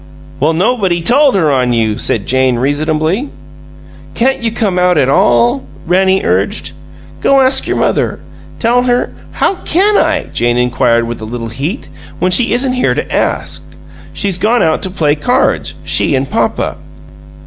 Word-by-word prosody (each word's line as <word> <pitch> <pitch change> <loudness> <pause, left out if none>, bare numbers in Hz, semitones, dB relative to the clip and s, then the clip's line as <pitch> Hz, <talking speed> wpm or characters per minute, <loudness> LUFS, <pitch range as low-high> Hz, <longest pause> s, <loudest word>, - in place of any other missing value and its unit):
"Well, 155 +3 +2
nobody 190 -1 +1
told 275 - +3
her 160 -6 +2
on 125 -2 +1
you," 110 -2 0
said 105 -1 -1
Jane, 130 -1 +1
reasonably. 155 - -1 0.9
"Can't 265 +2 +1
you 230 -1 -1
come 205 -5 -1
out 180 0 +2
at 130 - +2
all?" 120 -1 +3 0.2
Rannie 190 +2 +2
urged. - - -1 0.5
"Go 275 - +4
ask 265 0 +2
your - - -1
mother. - - 0 0.4
Tell 240 +1 +2
her 245 0 0
" - - -21
"How 390 - 0
can 400 +5 +2
I," 315 -2 +1
Jane 120 0 +1
inquired, 120 -1 +1
with 120 -1 -6
a - - -5
little 115 0 -5
heat, 145 - -4 0.3
"when 185 - 0
she 230 +6 +2
isn't 255 +2 +2
here 255 - 0
to - - -3
ask? - - -1 0.5
She's 195 -3 -2
gone 235 +4 +2
out 160 -1 +1
to 190 - -3
play 155 -5 +1
cards 150 -1 0
she - - +2
and 135 +1 -1
papa." - - -1
180 Hz, 165 wpm, -13 LUFS, -, 0.9 s, Go